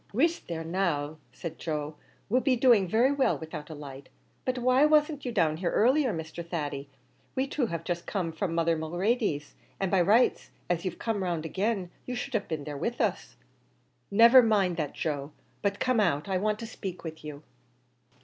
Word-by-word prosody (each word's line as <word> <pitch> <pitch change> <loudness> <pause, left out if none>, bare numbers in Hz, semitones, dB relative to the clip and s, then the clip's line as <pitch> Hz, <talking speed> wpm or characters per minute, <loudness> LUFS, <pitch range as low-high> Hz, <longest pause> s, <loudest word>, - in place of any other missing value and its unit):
"Whisht 325 +7 +1
there 165 -1 -4
now," 160 -4 -1
said 170 - -7
Joe; 150 -2 -3 0.3
"we'll 250 +5 +2
be 265 -1 +3
doing 230 -6 +5
very 230 +8 +3
well 280 -2 +2
without 155 -1 -8
a 160 - -7
light; 140 -2 -10 0.4
but 255 0 0
why 255 +2 +4
wasn't 300 -1 +3
you 245 - -2
down 165 -8 +2
here 175 0 -1
earlier, 255 - +3
Mr. 160 -1 -5
Thady? 145 -5 -4 0.5
We 260 - +1
two 275 -2 -1
have 165 -3 -4
just 175 0 -3
come 180 -5 -2
from 165 +1 -3
mother 165 0 +2
Mulready's, 175 - -1 0.3
an' 195 -2 -1
by 190 -2 +4
rights, 215 +8 +3 0.2
as 170 0 -1
you've 180 -2 -3
come 225 -3 -2
round 170 -4 -2
agin, 190 +1 -1 0.2
you 250 - -3
should 255 +2 -5
have 215 -3 -1
been 155 -3 -3
there 145 0 -6
with 235 +11 -3
us." - - -1 0.7
"Never 235 +5 +8
mind 205 -6 +2
that, 150 -4 -2
Joe, 145 -1 -3 0.3
but 200 0 -1
come 255 -3 +2
out; 165 -6 +1
I 190 -2 0
want 210 +2 0
to - - -4
spake 195 -5 -7
to 160 -2 -5
you." 150 0 -8
185 Hz, 190 wpm, -28 LUFS, 160-235 Hz, 0.7 s, Never